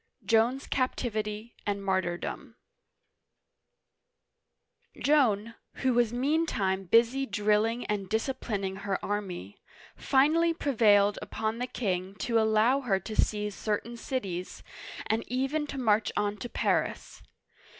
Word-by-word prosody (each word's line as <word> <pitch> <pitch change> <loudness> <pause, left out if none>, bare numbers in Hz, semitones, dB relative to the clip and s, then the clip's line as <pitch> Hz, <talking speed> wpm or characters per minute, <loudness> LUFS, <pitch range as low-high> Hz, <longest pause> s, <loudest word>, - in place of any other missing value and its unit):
JOAN'S 235 +4 +2
CAPTIVITY 220 -4 -2
AND 200 -1 -2
MARTYRDOM 185 -2 -2 2.4
JOAN, 230 -7 +2 0.2
who 260 -1 +1
was 235 -2 +3
meantime 245 -8 0
busy 235 +7 +3
drilling 215 +3 +1
and 200 -3 -2
disciplin 220 -2 -2
ing 190 0 -2
her 195 -1 -2
army, 185 - -4 0.3
finally 325 +5 +3
prevailed 210 -8 +3
upon 220 +1 -3
the 250 - -2
king 190 -5 -2
to 230 +3 +1
allow 220 +4 +3
her 200 -7 +1
to 215 +4 -7
seize 210 -1 0
certain 215 +4 -3
cities, 195 -8 -4 0.4
and 220 +1 0
even 270 +5 -1
to 280 - -6
march 220 -4 +2
on 205 0 0
to 240 - -6
Paris. - - -1
220 Hz, 115 wpm, -29 LUFS, 205-250 Hz, 2.4 s, was